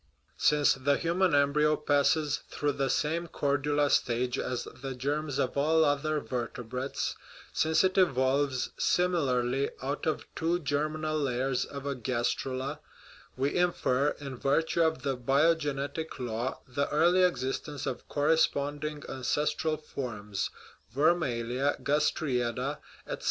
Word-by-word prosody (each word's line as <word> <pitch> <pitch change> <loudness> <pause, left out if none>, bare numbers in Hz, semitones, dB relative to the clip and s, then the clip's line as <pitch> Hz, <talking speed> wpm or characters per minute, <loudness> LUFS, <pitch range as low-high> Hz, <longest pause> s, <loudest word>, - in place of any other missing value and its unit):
Since 150 -1 +4
the 140 +2 +1
human 175 -1 +2
embryo 150 +2 +3
passes 150 0 +2
through 145 0 0
the 135 -1 -1
same 165 +6 0
chordula 145 -1 +1
stage 125 0 +1
as 125 -1 -2
the 135 -1 -7
germs 145 +2 -2
of 125 - 0
all 160 +3 +3
other 150 +1 +1
vertebrates, 125 0 -3 0.4
since 160 +2 +3
it 190 0 +2
evolves, 135 -4 +2
similarly, 140 -7 +1
out 140 +4 -3
of 155 - -1
two 170 +2 0
germinal 155 +1 -1
layers 130 -1 0
of 140 -1 -8
a 140 - -1
gastrula, 130 +3 -2 0.6
we 135 +2 0
infer, 150 -6 +1
in 140 -3 -6
virtue 160 +6 +1
of 160 -5 +1
the 135 -2 0
biogenetic 145 +3 0
law, 120 0 -3
the 140 +3 -1
early 170 +5 +4
existence 145 -4 -1
of 125 - -4
corresponding 145 0 +1
ancestral 150 +4 -1
forms 105 -9 -4 0.4
vermalia, 135 -3 +1
gastrae 145 -2 +1
ada, 120 -1 -2 0.3
etc. - - -5
145 Hz, 125 wpm, -29 LUFS, 130-155 Hz, 0.6 s, Since